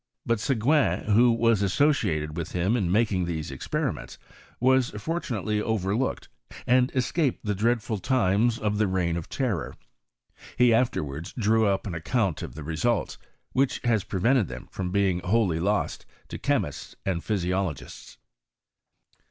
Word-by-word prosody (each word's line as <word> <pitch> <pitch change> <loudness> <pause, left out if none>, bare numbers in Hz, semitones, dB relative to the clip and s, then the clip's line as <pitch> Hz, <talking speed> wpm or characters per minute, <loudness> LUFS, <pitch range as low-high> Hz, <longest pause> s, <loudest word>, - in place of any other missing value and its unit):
Bat 115 -2 +1
Soguin, 120 - +2
who 120 +3 +6
was 115 -2 +2
associated 95 - +1
with 85 -1 -5
him 90 +6 +1
in 95 -8 0
making 100 -3 +2
these 80 -4 -4
experiments, 60 -2 -3 0.4
was 130 0 +3
fortunately 110 - -2
overlooked, 110 +3 -1 0.4
and 125 0 +3
escaped 130 +1 0
the 105 - 0
dreadful 110 +1 0
times 115 -1 +2
of 105 -1 -1
the 105 - +3
reign 90 -3 0
of 85 -2 -5
terror: 120 -11 -2 0.8
he 125 -1 +5
afterwards 80 - -1
drew 110 -1 +2
up 100 -1 0
an 100 - -4
account 90 +2 -1
of - - -7
the 75 - -7
results, 80 +10 -1 0.3
which 135 0 +1
has 115 -5 +2
prevented 115 +3 +1
them - - -8
from 90 -2 -4
bcmg 95 -3 +1
wholly 95 -5 +1
lost 100 +4 -1 0.2
to - - -6
chemists - - -2
and 90 -3 -1
physiologists. 95 -5 -3
105 Hz, 140 wpm, -26 LUFS, 90-120 Hz, 0.8 s, who